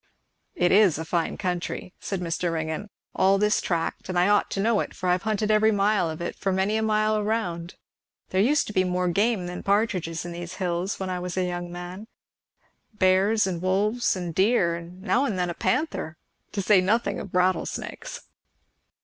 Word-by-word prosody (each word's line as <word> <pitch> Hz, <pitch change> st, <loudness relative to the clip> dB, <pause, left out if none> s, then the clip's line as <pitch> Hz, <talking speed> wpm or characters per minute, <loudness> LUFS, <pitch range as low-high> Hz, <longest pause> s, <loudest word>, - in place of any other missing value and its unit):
"It 175 Hz, -, +2 dB
is 195 Hz, -5 st, +5 dB
a 160 Hz, -, -4 dB
fine 165 Hz, 0 st, -1 dB
country," 180 Hz, 0 st, -3 dB
said 195 Hz, -2 st, -4 dB
Mr. 170 Hz, 0 st, -1 dB
Ringgan, 160 Hz, +5 st, -3 dB, 0.2 s
"all 195 Hz, +1 st, +4 dB
this 210 Hz, +1 st, +2 dB
tract; 170 Hz, 0 st, -2 dB
and 185 Hz, -, -1 dB
I 180 Hz, +2 st, +4 dB
ought 205 Hz, -, +3 dB
to -, -, -3 dB
know 220 Hz, +1 st, +2 dB
it, -, -, -4 dB
for 185 Hz, -, -4 dB
I -, -, +4 dB
have 180 Hz, 0 st, +1 dB
hunted 215 Hz, 0 st, 0 dB
every 215 Hz, +1 st, +4 dB
mile 200 Hz, -3 st, +2 dB
of 160 Hz, +1 st, -6 dB
it -, -, -3 dB
for 195 Hz, -, -1 dB
many 190 Hz, +3 st, +1 dB
a 220 Hz, -, +1 dB
mile 215 Hz, 0 st, +2 dB
around. 190 Hz, -6 st, -2 dB, 0.5 s
There 185 Hz, -, +2 dB
used 285 Hz, +7 st, +3 dB
to 210 Hz, -, -7 dB
be 185 Hz, -, +3 dB
more 180 Hz, 0 st, 0 dB
game 205 Hz, +1 st, +1 dB
than 180 Hz, 0 st, -5 dB
partridges 190 Hz, -6 st, 0 dB
in 175 Hz, -, -5 dB
these 175 Hz, +1 st, -7 dB
hills 180 Hz, +1 st, -2 dB
when 190 Hz, -1 st, -3 dB
I 180 Hz, -, -2 dB
was 180 Hz, 0 st, -5 dB
a 185 Hz, -, +1 dB
young 175 Hz, 0 st, -4 dB
man; 180 Hz, +4 st, -7 dB, 0.9 s
bears 195 Hz, +2 st, +3 dB
and 180 Hz, -3 st, -3 dB
wolves, 205 Hz, +6 st, +1 dB
and 175 Hz, -3 st, -4 dB
deer, 190 Hz, -2 st, +3 dB
and 170 Hz, +2 st, -10 dB
now 220 Hz, +7 st, +2 dB
and 210 Hz, -8 st, -2 dB
then 180 Hz, -1 st, 0 dB
a -, -, -4 dB
panther, 170 Hz, -, -1 dB, 0.4 s
to 200 Hz, -, -2 dB
say 190 Hz, 0 st, +5 dB
nothing 220 Hz, +6 st, +1 dB
of 190 Hz, -, -8 dB
rattlesnakes." 180 Hz, -1 st, -1 dB
185 Hz, 200 wpm, -25 LUFS, 175-210 Hz, 0.9 s, is